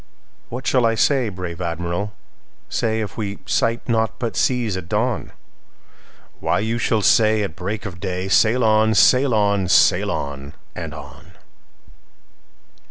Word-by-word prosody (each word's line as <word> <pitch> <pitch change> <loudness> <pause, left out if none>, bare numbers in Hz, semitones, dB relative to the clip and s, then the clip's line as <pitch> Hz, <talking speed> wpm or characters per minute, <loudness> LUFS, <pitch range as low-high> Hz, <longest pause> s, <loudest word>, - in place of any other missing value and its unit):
"What 125 +2 -6
shall 130 -2 +2
I 115 -1 +2
say, 130 -1 +2
brave 90 -3 -7
Admiral, 85 +4 -3 0.6
say, 110 -1 -1
If 105 - -6
we 100 -3 -4
sight 115 +1 0
naught 110 -1 0
but 115 -1 -4
seas 120 -6 0
at 90 -2 -7
dawn?""Why, - - -5
you 115 +3 -1
shall 110 -3 0
say 110 0 +4
at 100 - -5
break 100 +4 -5
of 90 -4 -7
day,'Sail 95 +6 +1
on! 110 0 +3
sail 130 +6 +5
on! 100 -3 +1
sail - - +4
on! 70 +1 -5 0.2
and - - -6
on! - - -12
110 Hz, 135 wpm, -21 LUFS, 95-115 Hz, 0.6 s, sail